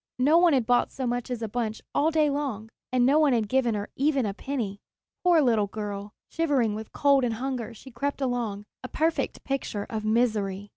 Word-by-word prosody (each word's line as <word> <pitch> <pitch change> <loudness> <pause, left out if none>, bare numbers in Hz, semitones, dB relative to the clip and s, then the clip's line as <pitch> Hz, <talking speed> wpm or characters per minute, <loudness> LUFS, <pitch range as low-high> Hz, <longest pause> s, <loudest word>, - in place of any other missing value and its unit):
No 295 +6 +5
one 345 -2 +5
had 255 -4 +2
bought 245 +1 +2
so 265 - -4
much 245 0 -2
as 240 -2 -3
a - - -1
bunch 220 0 -3
all 300 +2 +3
the 310 -2 +3
long 275 -7 -3
day, 225 - -22 0.2
and 250 -1 +3
no 285 +4 +4
one 300 -4 +4
had 225 -3 +1
given 245 -2 +1
her 205 0 -3
even 275 -2 +1
a 200 - -2
penny. 210 -4 -4 0.4
Poor 350 -3 +5
little 225 -5 +2
girl! 205 0 -5 0.2
Shivering 280 -10 +1
with 215 +1 -7
cold 280 -2 +3
and 235 -2 0
hunger 250 -2 -3
she 265 +4 -13
crept 280 +4 -3
along, 240 -6 -2 0.2
a - - -4
perfect 320 +5 -1
picture 265 -7 -3
of 220 -1 -3
misery! 215 -3 0
245 Hz, 210 wpm, -26 LUFS, 215-275 Hz, 0.4 s, No